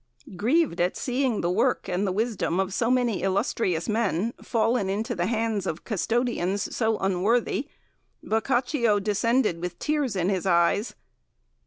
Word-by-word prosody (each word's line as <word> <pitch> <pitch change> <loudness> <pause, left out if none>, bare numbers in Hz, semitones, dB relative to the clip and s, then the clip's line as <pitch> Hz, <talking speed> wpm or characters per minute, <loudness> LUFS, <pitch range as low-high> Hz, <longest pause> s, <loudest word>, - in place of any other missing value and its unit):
"Grieved 245 - +1
at 180 +1 0
seeing 255 -3 0
the 175 - 0
work 180 - +1
and 185 +3 -1
the - - 0
wisdom 205 -3 -1
of 190 0 -1
so 230 +3 0
many 245 -5 +1
illustrious 185 -2 0
men 215 -1 0
fallen 225 -3 0
into 220 +5 -2
the 175 -4 -1
hands 225 -2 -1
of 160 - -4
custodians 215 -3 -1
so 220 -2 +1
unworthy, 210 +8 0 0.6
Boccaccio 235 -1 +1
descended 210 -2 +1
with 180 -1 -4
tears 295 -7 -1
in 180 0 0
his 190 -1 -1
eyes. 170 +5 +2
215 Hz, 145 wpm, -26 LUFS, 185-240 Hz, 0.6 s, eyes